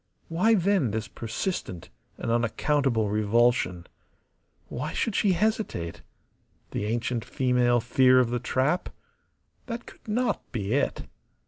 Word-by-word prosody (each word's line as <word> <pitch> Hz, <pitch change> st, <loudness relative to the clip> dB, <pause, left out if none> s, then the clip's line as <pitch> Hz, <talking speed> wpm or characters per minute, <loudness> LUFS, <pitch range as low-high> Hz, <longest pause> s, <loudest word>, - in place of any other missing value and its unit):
Why, 185 Hz, +8 st, +3 dB
then, 190 Hz, -, +2 dB
this 110 Hz, +1 st, -3 dB
persistent 115 Hz, -, -4 dB, 0.3 s
and 115 Hz, -, -3 dB
unaccountable 120 Hz, -1 st, +1 dB
revulsion? 105 Hz, -4 st, +2 dB, 0.8 s
Why -, -, -4 dB
should 225 Hz, -, -1 dB
she 195 Hz, 0 st, +3 dB
hesitate? 210 Hz, -, -1 dB, 0.7 s
The 105 Hz, -, -2 dB
ancient 115 Hz, +1 st, -1 dB
female 125 Hz, -2 st, +2 dB
fear 130 Hz, +2 st, +4 dB
of 120 Hz, -2 st, +2 dB
the 120 Hz, -, 0 dB
trap? 130 Hz, +7 st, 0 dB, 0.8 s
That 235 Hz, -1 st, -5 dB
could -, -, -16 dB
not 240 Hz, +3 st, 0 dB
be 105 Hz, -3 st, -2 dB
it. 140 Hz, -, 0 dB
125 Hz, 120 wpm, -27 LUFS, 110-175 Hz, 0.8 s, fear